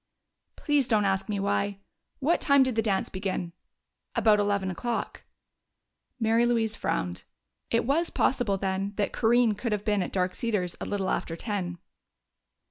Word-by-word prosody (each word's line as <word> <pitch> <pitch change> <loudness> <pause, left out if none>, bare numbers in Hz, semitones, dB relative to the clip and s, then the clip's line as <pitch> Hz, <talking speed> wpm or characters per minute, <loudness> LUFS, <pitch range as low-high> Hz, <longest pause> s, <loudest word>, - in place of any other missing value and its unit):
"Please 290 -4 +1
don't 215 -4 +3
ask 195 +1 0
me 205 -1 -1
why! 200 0 0 0.4
What 310 +5 +1
time 280 -2 +5
did 260 -1 0
the 225 - +1
dance 205 -3 0
begin?" 185 -2 -3 0.6
"About 215 -2 +4
eleven 200 -2 0
o'clock." 235 +6 -3 1.0
Mary 225 +1 +3
Louise 230 -2 +2
frowned; 90 0 -2 0.5
it 230 0 +1
was 320 +7 +1
possible, 245 -7 +1
then, 195 +1 -2
that 205 -1 -1
Corinne 235 -1 +3
could 225 +3 -3
have 210 -1 -3
been 210 -2 +2
at 180 - -3
Dark 185 -1 0
Cedars 195 -7 -1
a - - -2
little 195 -2 -1
after 165 - -2
ten. 180 -2 -3
210 Hz, 155 wpm, -27 LUFS, 190-235 Hz, 1.0 s, time